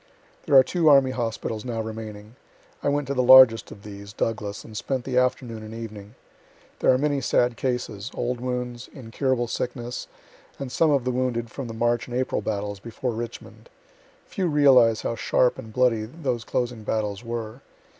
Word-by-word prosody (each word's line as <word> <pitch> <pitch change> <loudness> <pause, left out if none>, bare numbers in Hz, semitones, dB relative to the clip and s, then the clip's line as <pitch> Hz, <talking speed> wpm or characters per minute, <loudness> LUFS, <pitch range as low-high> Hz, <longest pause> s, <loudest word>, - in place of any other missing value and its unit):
There 140 - +3
are 130 - +9
two 165 +2 +2
army 135 -2 +6
hospitals 115 -3 -3
now 120 -3 -4
remaining. 110 0 -7 0.5
I - - +1
went 145 0 0
to 140 - -1
the 130 - +1
largest 125 -2 +7
of 100 - -12
these 100 -1 -10
(Douglas) 105 -2 -3
and 110 - -12
spent 130 +3 -2
the 130 - -3
afternoon 125 -3 -1
and 110 +1 -9
evening. 110 -1 -9 0.6
There - - +4
are 130 - +4
many 145 0 0
sad 120 -1 +2
cases, 120 -4 -3
old 120 0 -2
wounds, 125 -1 -4
incurable 125 0 -1
sickness, 120 +1 -4 0.5
and 135 -2 -6
some 160 +5 +3
of 140 -4 +2
the 125 - -1
wounded 120 -2 -2
from 135 -3 -6
the 115 - -7
March 120 +1 0
and 125 0 -3
April 130 - -1
battles 100 0 -3
before 115 +4 -4
Richmond. 120 - -8 0.6
Few 190 -3 -2
realize 130 -7 +5
how - - -1
sharp 120 +2 +1
and 110 - -9
bloody 115 -2 +2
those 125 -3 -4
closing 120 -2 -2
battles 105 -1 -2
were. 115 +1 -5
120 Hz, 175 wpm, -24 LUFS, 110-130 Hz, 0.6 s, are